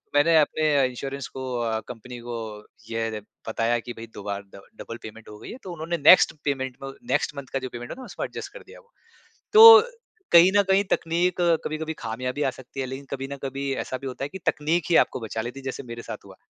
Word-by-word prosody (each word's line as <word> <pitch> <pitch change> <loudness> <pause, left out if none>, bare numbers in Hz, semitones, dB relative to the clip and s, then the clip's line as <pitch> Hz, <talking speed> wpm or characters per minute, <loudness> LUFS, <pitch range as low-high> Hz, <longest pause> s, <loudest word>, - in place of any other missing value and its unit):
मैंने 160 +3 +5
अपने 150 -2 +2
इंश्योरेंस 135 +2 -6
को 130 0 -7
अ, 110 -1 -1
कंपनी 125 +1 -9
को 120 -1 -4 0.5
यह 115 -1 -2 0.3
बताया 115 +1 +1
कि 120 +1 -7
भई 115 - -8
दो 100 - -8
बार 100 -1 -4
डब 100 - -13
डबल 115 - -7
पेमेंट 110 0 -10
हो 105 - -10
गई - - -10
है। - - -8
तो 180 -2 -7
उन्होंने 170 +1 -3
नेक्स्ट 185 - +8
पेमेंट 130 -3 -2
में 135 - -5 0.2
नेक्स्ट 155 - 0
मंथ 135 -2 -7
का 135 - 0
जो 130 - -6
पेमेंट 120 0 -7
है - - -5
ना 255 - -8
उसमें - - -5
एडजस्ट - - -8
कर - - -9
दिया - - -13
वो। 475 -1 -25 0.6
तो 445 0 +11 0.5
कहीं 170 +2 +8
न 205 - +7
कहीं 195 +1 +4
तकनीक 170 +2 0 0.3
कभी-कभी 160 +1 -3
खामियाँ 125 +2 -4
भी 145 +2 -2
आ 135 - +2
सकती 130 +1 -10
है - - -2
लेकिन 135 +2 -7
कभी 135 -1 -4
ना 140 0 -6
कभी 135 +1 -3
ऐसा 130 - -4
भी 135 - -7
होता 130 +1 -6
है 145 - -6
कि 190 - -8
तकनीक 155 +3 +1
ही 170 - +3
आपको - - -7
बचा 110 -1 -4
लेती 125 +4 -6
है - - -13
जैसे 130 - -4
मेरे 115 -1 -8
साथ - - -8
हुआ। - - -13
135 Hz, 240 wpm, -25 LUFS, 120-155 Hz, 0.6 s, तो